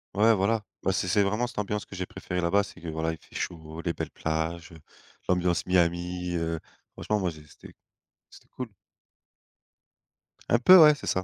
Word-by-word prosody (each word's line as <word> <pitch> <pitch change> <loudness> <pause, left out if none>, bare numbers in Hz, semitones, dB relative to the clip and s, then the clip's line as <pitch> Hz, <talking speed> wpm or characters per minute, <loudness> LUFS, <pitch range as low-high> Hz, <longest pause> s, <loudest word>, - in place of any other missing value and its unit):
Ouais, 110 +2 +5
voilà, 105 +3 +1 0.2
bah, 95 - +2
c'est 90 - -1
c'est 100 +3 +3
vraiment 105 +5 0
cette - - -13
ambiance 105 0 -2
que 95 - -10
j'ai 90 - -3
préféré 90 0 -5
là-bas, 90 +4 +3
c'est - - -12
que, 85 - -8
voilà, 80 +1 -2
il 80 - -8
fait - - -23
chaud, 80 -1 -5
les 85 - -1
belles - - -5
plages, 80 +2 -3
heu, 80 - -12 0.5
l'ambiance 90 -1 +1
Miami, 90 0 0
heu, 80 -1 -2 0.3
franchement, 105 -1 -1
moi, 90 -3 -1
j'ai 75 -1 -13
c'était - - -15 0.6
c'était - - -18
cool. 125 -2 -6 1.8
Un 120 - +4
peu, 185 +9 +9
ouais, 150 -1 +9
c'est 145 - -9
ça. 95 - 0
90 Hz, 190 wpm, -27 LUFS, 85-105 Hz, 1.8 s, peu